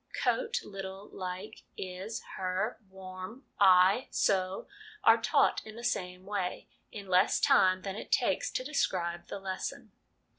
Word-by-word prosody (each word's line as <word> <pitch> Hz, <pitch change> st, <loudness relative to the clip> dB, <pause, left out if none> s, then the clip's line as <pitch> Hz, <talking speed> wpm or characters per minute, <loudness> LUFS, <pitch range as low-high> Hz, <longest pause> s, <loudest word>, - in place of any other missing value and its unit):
' -, -, -4 dB
Coat, 485 Hz, -1 st, +1 dB
little, 195 Hz, 0 st, -7 dB
like, 185 Hz, +3 st, -6 dB, 0.2 s
is, 190 Hz, +4 st, -5 dB
her, 190 Hz, +4 st, -2 dB
warm, 190 Hz, +6 st, -9 dB
I, 190 Hz, +4 st, +6 dB
so/ 190 Hz, -1 st, 0 dB, 0.4 s
are -, -, +6 dB
taught -, -, +3 dB
in 220 Hz, 0 st, -10 dB
the 235 Hz, -, -9 dB
same 180 Hz, -5 st, -2 dB
way, 195 Hz, -3 st, -3 dB, 0.2 s
in 200 Hz, -2 st, -8 dB
less 185 Hz, +2 st, +4 dB
time 185 Hz, -9 st, +4 dB
than 195 Hz, -1 st, -4 dB
it 220 Hz, -, -8 dB
takes -, -, +2 dB
to -, -, -1 dB
describe 175 Hz, -, -1 dB
the -, -, -5 dB
lesson. 190 Hz, -1 st, -5 dB
190 Hz, 145 wpm, -31 LUFS, 185-210 Hz, 0.4 s, I